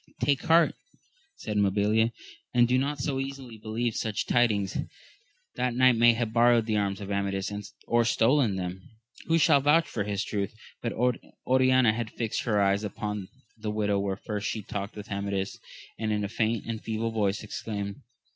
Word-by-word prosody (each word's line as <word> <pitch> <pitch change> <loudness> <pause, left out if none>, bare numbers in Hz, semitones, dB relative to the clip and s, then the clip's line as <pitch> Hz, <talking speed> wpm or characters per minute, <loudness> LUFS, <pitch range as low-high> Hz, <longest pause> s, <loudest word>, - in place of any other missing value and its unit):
Take 140 -2 +2
heart, 165 +1 +5 0.6
said 105 -1 -4
Mabilia, 105 +3 +2 0.4
and 120 -1 +5
do 125 +1 +3
not 145 +2 -1
so 135 +1 -1
readily 135 -4 -6
believe 110 +2 -2
such 110 -2 -2
tidings; 105 -5 +2 0.8
that 125 -1 0
knight 130 -1 +5
may 120 +1 +6
have 115 -1 -2
borrowed 120 -1 +5
the 110 -1 0
arms 100 -1 -1
of 100 0 -6
Amadis, 100 0 -1 0.3
or 120 0 +3
stolen 115 -1 +3
them: 90 0 -4 0.5
who 165 - +3
shall 145 -3 +5
vouch 160 +4 +4
for 105 - -2
his 100 0 -2
truth? 100 0 -3 0.3
But 115 - -2 0.5
Oriana 130 -3 +4
had 115 -1 -3
fixed 115 -2 -2
her 105 -4 +2
eyes 100 +1 +2
upon 105 -1 -4 0.3
the 110 -1 -5
window 105 -1 0
where 100 -1 -1
first 105 -1 -4
she 110 0 -3
talked 100 +1 -5
with 105 0 -9
Amadis, 100 -1 -2 0.4
and 110 -1 -1
in 105 -1 0
a - - -1
faint 110 0 -1
and 115 -1 -4
feeble 115 +1 -2
voice 105 -2 0
exclaimed. 100 -2 -5
110 Hz, 175 wpm, -28 LUFS, 100-120 Hz, 0.8 s, may